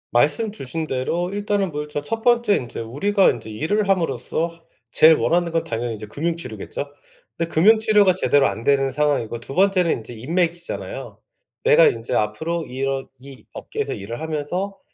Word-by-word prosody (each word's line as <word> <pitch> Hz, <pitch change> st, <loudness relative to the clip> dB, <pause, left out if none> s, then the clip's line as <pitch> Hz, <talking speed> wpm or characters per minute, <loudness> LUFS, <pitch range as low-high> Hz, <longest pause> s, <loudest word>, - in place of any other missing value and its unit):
말씀 150 Hz, -, +2 dB
주신 160 Hz, -, -5 dB
대로 165 Hz, +7 st, -1 dB
일단은 205 Hz, -2 st, -1 dB
뭐 150 Hz, 0 st, -3 dB
일 150 Hz, -, -12 dB
저 150 Hz, 0 st, -3 dB
첫 225 Hz, +10 st, -4 dB
번째 240 Hz, -3 st, +3 dB
인제 120 Hz, -8 st, -4 dB
우리가 190 Hz, -, +2 dB
인제 110 Hz, -2 st, -4 dB
일을 195 Hz, -, -1 dB
함으로써 165 Hz, 0 st, -1 dB, 0.2 s
제일 160 Hz, +6 st, +7 dB
원하는 170 Hz, +2 st, +1 dB
건 165 Hz, 0 st, 0 dB
당연히 115 Hz, 0 st, -3 dB
이제 105 Hz, 0 st, -8 dB
금융 165 Hz, +10 st, -2 dB
치료겠죠. 130 Hz, 0 st, -6 dB, 0.5 s
근데 165 Hz, 0 st, -2 dB
금융 210 Hz, +8 st, +6 dB
치료가 210 Hz, -3 st, +4 dB
제대로 145 Hz, -6 st, +3 dB
안 115 Hz, -, -4 dB
되는 135 Hz, 0 st, +3 dB
상황이고 135 Hz, -5 st, 0 dB
2 135 Hz, -, -7 dB
번째는 185 Hz, -1 st, +3 dB
인제 115 Hz, +1 st, -4 dB
인맥이잖아요. 170 Hz, -, -3 dB, 0.4 s
내가 480 Hz, +1 st, +6 dB
인제 430 Hz, -, -2 dB
앞으로 160 Hz, +11 st, -1 dB
이런 135 Hz, 0 st, -3 dB
이 130 Hz, -4 st, -13 dB
업계에서 -, -, -4 dB
일을 115 Hz, +6 st, -7 dB
하면서 160 Hz, +6 st, -3 dB
160 Hz, 370 characters per minute, -22 LUFS, 130-190 Hz, 0.5 s, 제일